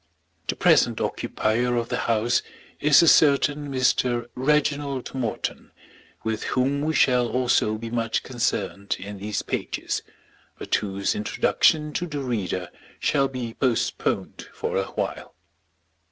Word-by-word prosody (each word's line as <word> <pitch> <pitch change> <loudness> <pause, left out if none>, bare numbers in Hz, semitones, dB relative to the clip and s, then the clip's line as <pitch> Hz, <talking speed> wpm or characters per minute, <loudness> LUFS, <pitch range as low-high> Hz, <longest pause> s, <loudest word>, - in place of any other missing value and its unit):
The - - -1
present - - +4
occupier 120 +3 0
of 120 -1 -1
the - - -1
house 115 +1 +2 0.4
is 150 +2 +6
a - - +4
certain 145 -1 +4
Mr. 125 -2 +1
Reginald 140 -1 0
Morton, 125 -5 -4 0.5
with 110 -1 -2
whom 135 +3 0
we 155 +1 0
shall 125 -2 +4
also 120 -3 +1
be 115 +1 -7
much 115 -1 -1
concerned 120 -5 -2
in 100 +1 -8
these 105 +1 -3
pages, - - -3 0.6
but - - -7
whose 100 -1 0
introduction 150 +8 +2
to 175 - -2
the 150 -3 -4
reader 95 -7 -3 0.3
shall 140 -2 +2
be 125 -4 -5
postponed 125 -2 -1
for - - -4
awhile. - - -3
125 Hz, 125 wpm, -24 LUFS, 110-140 Hz, 0.6 s, is